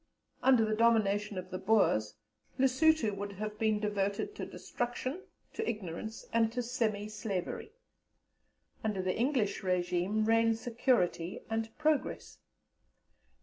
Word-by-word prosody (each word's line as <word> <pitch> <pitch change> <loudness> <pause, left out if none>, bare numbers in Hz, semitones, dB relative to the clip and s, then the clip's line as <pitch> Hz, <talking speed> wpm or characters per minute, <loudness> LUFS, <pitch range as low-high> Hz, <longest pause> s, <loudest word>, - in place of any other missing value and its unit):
"Under 255 -3 +5
the 215 - 0
domination 210 -3 +2
of 185 +1 -6
the 185 - -3
Boers, 110 - +2 0.4
Lessuto 265 -3 +3
would 200 0 -5
have 210 +1 -5
been 215 -1 +2
devoted 205 - -1
to - - -5
destruction, 255 +7 -4 0.3
to 445 - -2
ignorance, 210 +2 -5
and 225 -1 +3
to 245 0 -1
semi 220 -4 -1
slavery. 215 - -4 1.1
Under 210 -4 -1
the 185 0 0
English 240 -4 +1
régime 180 +3 0
reign 225 0 +4
security 225 -7 0
and 225 0 -1
progress. 305 -1 0
215 Hz, 120 wpm, -32 LUFS, 200-240 Hz, 1.1 s, Under